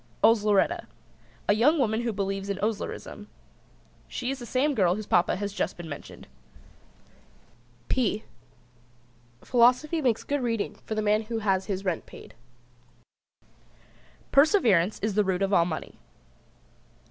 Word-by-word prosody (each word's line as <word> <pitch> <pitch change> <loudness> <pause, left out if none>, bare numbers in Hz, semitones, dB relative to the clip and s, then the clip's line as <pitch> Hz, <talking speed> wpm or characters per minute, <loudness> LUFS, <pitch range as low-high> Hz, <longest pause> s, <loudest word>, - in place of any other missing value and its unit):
OSLERETTA. 220 - +3 0.6
A - - +5
young 265 +10 +4
woman 225 -5 +1
who 235 -1 -1
believes 195 -1 -3
in 200 - -2
Oslerism. 210 0 -4 0.8
She 250 +1 -3
is 270 - -5
the 240 - -8
same 280 +5 +1
girl 185 -7 +2
whose 215 +1 -6
Papa 175 -2 +2
has 200 +1 -4
just - - -2
been 175 -1 -8
mentioned. 145 -2 -9 1.6
[Illustration: - - -33
"P 220 -4 0 1.2
Philosophy 255 +7 +3
makes 245 -5 +1
good 285 -1 -2
reading 230 -4 -1
for 220 - -3
the 215 - -1
man 210 +1 +2
who 230 +1 -3
has 195 -3 0
his 195 -1 -3
rent 180 -4 -2
paid."] - - -13 2.0
Perseverance 235 - +4
is 215 -1 0
the 210 +1 +3
root 190 0 0
of 195 +1 0
all 170 -3 +5
money. 160 -3 -6
215 Hz, 140 wpm, -27 LUFS, 195-245 Hz, 2.0 s, A